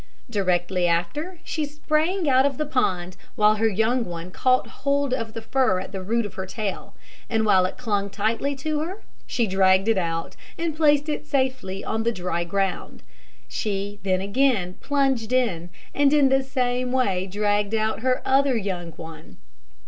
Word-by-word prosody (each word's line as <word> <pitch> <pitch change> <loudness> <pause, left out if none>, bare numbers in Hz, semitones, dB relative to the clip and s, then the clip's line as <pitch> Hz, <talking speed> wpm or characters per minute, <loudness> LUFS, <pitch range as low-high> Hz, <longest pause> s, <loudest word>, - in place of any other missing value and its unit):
Directly 180 -3 +1
after, 175 - -1
she 310 - -2
sprang 305 +4 0
out 260 -1 +5
of 275 -2 0
the 305 - -1
pond, 185 - -1 0.2
while 215 -2 +4
her 225 +1 +3
young 225 +4 +1
one 175 -2 -7
caught 255 +6 +2 0.2
hold 280 -1 +1
of 230 -3 -3
the 225 - -5
fur 255 -5 +2
at 185 - -7
the 195 -1 -5
root 230 +4 0
of 205 - -7
her 190 0 -5
tail; 205 0 -5 0.3
and 220 -2 +1
while 190 -3 +4
it - - -9
clung 205 -5 -1
tightly 220 +8 -1
to 300 +3 -2
her, 360 +7 -5 0.2
she 235 - +1
dragged 190 0 +3
it 225 -4 +3
out, 165 -2 -3 0.2
and 330 -2 -2
placed 295 -1 +3
it 300 0 -3
safely 260 -9 -1
on 220 0 -1
the 230 +1 +1
dry 180 -4 -2
ground. 195 +2 -2 0.4
She 205 -1 -3
then 185 -1 0
again 200 -3 +1
plunged 270 -5 0
in, 195 -10 0 0.2
and 285 -1 +3
in 290 -3 +5
the 270 0 +3
same 250 -1 -1
way 195 -8 +1
dragged 205 +2 0
out 220 0 0
her 255 +2 0
other 270 -1 +3
young 180 -5 -4
one. 160 0 -11
225 Hz, 175 wpm, -24 LUFS, 190-270 Hz, 0.4 s, out